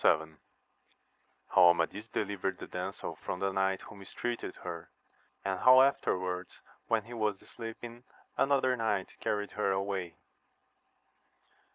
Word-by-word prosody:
— - - -13
How 80 +1 +4 1.3
Amadis 85 +5 +3
deliyered 95 -4 -2
the - - -7
damsel 90 +2 -5
from 90 - -3
the 100 0 +1
knight 95 0 +1
who - - -11
mistreated 115 +4 -4
her, - - -6 0.6
and 95 -1 0
how 130 +1 +8
afterwards 90 -9 0 0.3
when 115 -2 +2
he 120 +3 -10
was 105 -4 0
sleeping 115 +1 -8 0.3
another 135 -2 +3
knight 105 -5 -1
carried 105 -1 -1
her 105 -2 0
away. 95 -3 -2
100 Hz, 125 wpm, -32 LUFS, 95-115 Hz, 1.3 s, how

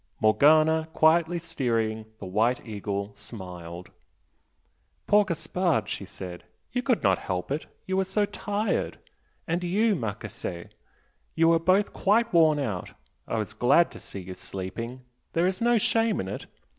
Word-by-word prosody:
Morgana, 155 +8 +5
quietly 165 +2 +4
steering 115 -9 -1
the 100 - -8
"White 110 +7 +1
Eagle," 100 -2 -4
smiled. 90 -5 -9 1.1
"Poor 210 0 +5
Gaspard!" 165 - 0
she 100 - -4
said 90 -2 -8 0.3
"You 250 - 0
could 250 -3 +1
not 95 -2 +3
help 90 +4 -3
it! 150 +3 -2 0.2
You 190 0 -1
were 190 - +3
so 190 +2 +1
tired! 205 +1 -2 0.5
And 175 +2 -1
you, 210 +5 +2
Marchese! 105 - -5 0.7
You 165 0 +4
were 165 0 +5
both 185 +5 +2
quite 225 +2 +2
worn 160 -3 +5
out! 110 -11 -3 0.4
I - - -1
was 110 0 -3
glad 125 +10 +4
to - - -10
see 100 - -8
you 90 +1 -7
sleeping 115 +8 -6 0.3
there 170 +1 +2
is 185 +3 -1
no 240 0 +4
shame 225 0 +2
in 95 - -3
it! 100 - -6
150 Hz, 150 wpm, -27 LUFS, -, 1.1 s, Morgana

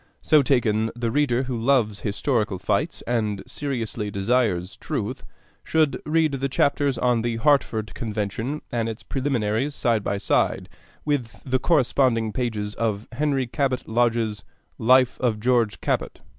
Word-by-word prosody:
So 155 -2 +5
taken, 115 -5 +2
the 120 -1 -2
reader 130 -3 +2
who 130 -1 -3
loves 115 -4 +2
historical 105 -1 -1
fights 100 - -1
and 110 -4 -1
seriously 115 -6 -3
desires 100 -3 0
truth - - -4 0.4
should 155 -3 +1
read 160 0 +2
the 135 0 -2
chapters 140 0 +1
on 125 -1 +2
the 120 0 -1
Hartford 115 -4 +1
Convention 110 +4 -3
and 115 -1 -1
its 110 - -7
preliminaries 130 -1 -1
side 115 -3 +1
by 100 - -1
side - - 0 0.4
with 145 -6 -2
the 130 -1 +1
corresponding 125 -7 +2
pages 105 -4 -2
in 110 -2 -1
Henry 135 0 0
Cabot 130 0 -1
Lodge's 115 -2 0 0.4
'Life 130 +2 +4
of 115 -4 0
George 120 -2 +1
Cabot.' - - -1
120 Hz, 140 wpm, -24 LUFS, 110-135 Hz, 0.4 s, So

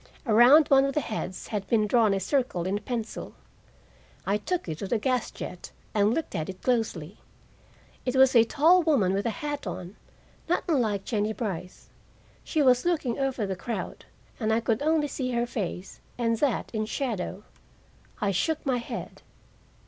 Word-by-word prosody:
Around 250 +7 +7
one 270 -1 +6
of 275 - -2
the - - +3
heads 215 -7 -5
had 205 -3 -3
been 220 -2 +3
drawn 220 -1 +3
a 195 - +1
circle 195 - 0
in 195 +2 -1
pencil. 230 +1 -5 0.9
I 200 +2 +1
took 355 - -3
it 160 -1 -4
to 200 - -4
the 235 - +1
gas 250 +1 0
jet 180 - -8 0.2
and 205 0 +3
looked 320 +7 -2
at 160 -3 -3
it 185 -1 -8
closely. 215 -8 -1 0.8
It 250 0 -2
was 265 -1 +5
a 230 - +8
tall 320 +9 +4
woman 270 - +2
with 200 +3 0
a 230 - -4
hat 290 -1 -3
on, 180 +3 -6 0.5
not 355 - +1
unlike 220 - +1
Jennie 215 -2 0
Brice. 185 -6 -5 0.5
She 310 -3 +1
was 250 -2 +4
looking 305 -9 0
over 265 -5 0
the 195 -1 -3
crowd, 230 +6 -5 0.3
and 220 -2 0
I 220 - +3
could 225 -1 0
see 295 -3 0
only 250 - -2
her 240 - +1
face, 195 -5 -5 0.2
and 230 -1 +1
that 285 -5 0
in 215 -1 -1
shadow. 210 -6 -3 0.8
I 200 - +1
shook 310 - -1
my 260 -3 +1
head. 235 - -6
230 Hz, 175 wpm, -27 LUFS, 200-270 Hz, 0.9 s, a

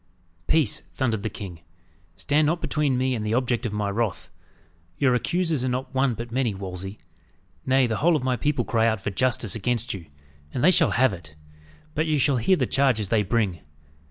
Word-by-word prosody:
"Peace!" 155 -8 +2 0.2
thundered 115 -6 0
the 110 - -2
king. 95 -4 -8 0.6
"Stand 150 - +1
not 170 +3 +1
between 150 -5 0
me 130 +1 +1
and 110 -4 -2
the 110 +1 0
object 125 -1 0
of - - -5
my 105 -1 -1
wrath. 100 -1 -2 0.7
Your 135 -3 +3
accusers 165 +2 0
are 130 - 0
not 130 +2 -3
one 130 -2 +2
but 115 +2 -7
many, 120 -4 0
Wolsey; 95 +1 -6 0.7
nay, 130 0 +4
the 110 -3 -1
whole 170 +2 +3
of 145 - -1
my 130 -1 +1
people 135 -2 0
cry 115 0 +2
out 110 -2 +1
for 100 +1 -3
justice 120 0 +1
against 115 +2 -1
you. 90 -5 -8 0.5
And 125 - -1
they 180 - +7
shall - - +4
have 130 -3 +4
it. 80 -4 -10 0.6
But 155 +2 0
you 155 -1 +2
shall 140 -1 +3
hear 155 +11 +3
the - - +1
charges 125 -8 +1
they 110 0 +3
bring. 100 -4 0
120 Hz, 200 wpm, -25 LUFS, 105-135 Hz, 0.7 s, they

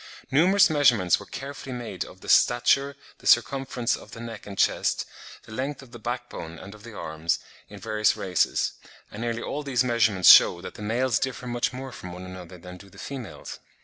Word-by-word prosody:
Numerous 185 +8 +5
measurements 125 - +3
were - - -11
carefully 135 -1 -7
made 115 -6 -5
of 95 - -14
the - - -12
stature, 135 +4 +3 0.2
the - - -8
circumference 125 0 +2
of - - -13
the 115 - -9
neck 115 -3 -8
and 100 -1 -8
chest, - - +1 0.4
the - - -15
length 135 +5 -4
of 125 - -17
the 120 - -10
back 120 +2 -4
bone 80 -5 -8
and 100 +4 -10
of 105 - -14
the 110 -1 -11
arms, 80 +1 -2 0.3
in 105 - -11
various 110 0 +1
races; 90 -2 +1 0.4
and 105 - -8
nearly 115 -1 -2
all 150 - -3
these 130 -4 +1
measurements 110 -6 +5
shew 85 - +7
that - - -7
the - - -11
males 115 +3 +1
differ 130 -1 -3
much 120 -1 -1
more 130 +1 -7
from 90 -6 -9
one 90 +1 -8
another 90 -1 -10
than 90 +1 -11
do 100 +2 -15
the - - -18
females. 120 - -8
115 Hz, 205 wpm, -26 LUFS, 95-130 Hz, 0.4 s, shew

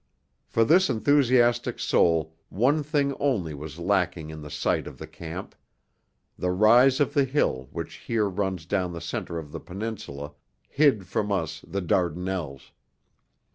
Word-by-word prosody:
For 115 - +2
this 185 +8 +5
enthusiastic 120 -1 +3
soul 80 -2 +2
one 135 +9 +2
thing 145 -2 0
only 105 - 0
was 75 +1 -8
lacking 85 -3 0
in 80 0 -8
the 75 - -8
site - - -1
of - - -9
the - - -7
camp: 85 +3 -8 0.9
the 90 - 0
rise 120 +8 +5
of 145 -1 +1
the 140 -2 +4
hill 125 - 0
which - - -6
here 110 -3 0
runs 95 -3 -2
down 90 -1 -1
the 85 - -5
centre 85 +1 -4
of 75 -3 -7
the - - -6
Peninsula, 90 -7 -6 0.3
hid 135 -10 +3
from 100 +3 -2
us 85 -6 -2
the 100 - -3
Dardanelles. 90 -5 -2
95 Hz, 150 wpm, -26 LUFS, 85-120 Hz, 0.9 s, this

